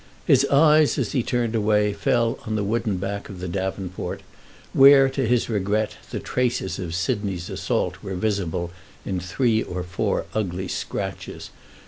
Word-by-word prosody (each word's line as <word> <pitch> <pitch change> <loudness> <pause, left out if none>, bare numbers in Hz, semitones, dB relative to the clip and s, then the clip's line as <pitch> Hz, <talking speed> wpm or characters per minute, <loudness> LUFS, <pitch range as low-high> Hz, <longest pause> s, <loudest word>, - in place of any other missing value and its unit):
His - - +5
eyes 150 +1 +5
as - - -1
he 130 - +1
turned 120 -1 -1
away 105 -1 +2
fell 115 +2 +1
on 110 - -1
the 105 - 0
wooden 110 -1 -1
back 100 +3 -4
of 95 -3 -8
the 90 - -4
davenport, 95 0 -4 0.5
where, 135 0 +8
to 135 -2 -1
his 120 0 +2
regret, 105 0 -1
the - - -4
traces 125 -6 -1
of 85 -3 -4
Sidney's 95 -2 -2
assault 90 +1 -2
were 95 -2 -5
visible 90 -4 -1 0.3
in 95 -2 -2
three 110 +5 +1
or 90 -4 -4
four 90 0 -1
ugly 95 -3 -2
scratches. - - -5
105 Hz, 155 wpm, -24 LUFS, 95-115 Hz, 0.5 s, where